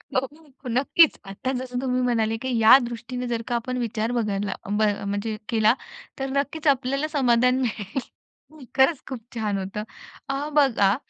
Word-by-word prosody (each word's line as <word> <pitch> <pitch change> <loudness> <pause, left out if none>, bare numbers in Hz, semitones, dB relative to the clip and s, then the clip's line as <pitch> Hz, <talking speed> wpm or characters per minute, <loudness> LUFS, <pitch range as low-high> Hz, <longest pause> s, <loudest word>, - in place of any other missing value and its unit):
हो, 275 0 -5
नक्कीच. 275 +6 +4
आता 195 +7 -4
जसं 250 -1 -4
तुम्ही 255 -1 0
म्हणाले 225 -3 +1
की 255 -2 0
या 225 +3 +9
दृष्टीनं 245 +1 -5
जर 235 -1 -2
का 240 - -1
आपण 250 +2 -2
विचार 230 -1 -2
बदलला 205 -4 -1 0.2
ब 210 +1 0 0.3
म्हणजे 205 +2 -2
केला. 220 -1 +4 0.5
तर 270 0 -2
नक्कीच 295 +3 -1
आपल्याला 275 +2 +2
समाधान 250 -4 +3
मिळेल. 220 -1 -2 0.8
खरंच 265 +2 +4
खूप 260 -3 -5 0.2
छान! 210 -3 -1
होतं. 195 +2 -4 0.5
अ, 275 +2 -2
बघा 240 -9 +4
245 Hz, 150 wpm, -24 LUFS, 220-270 Hz, 0.8 s, या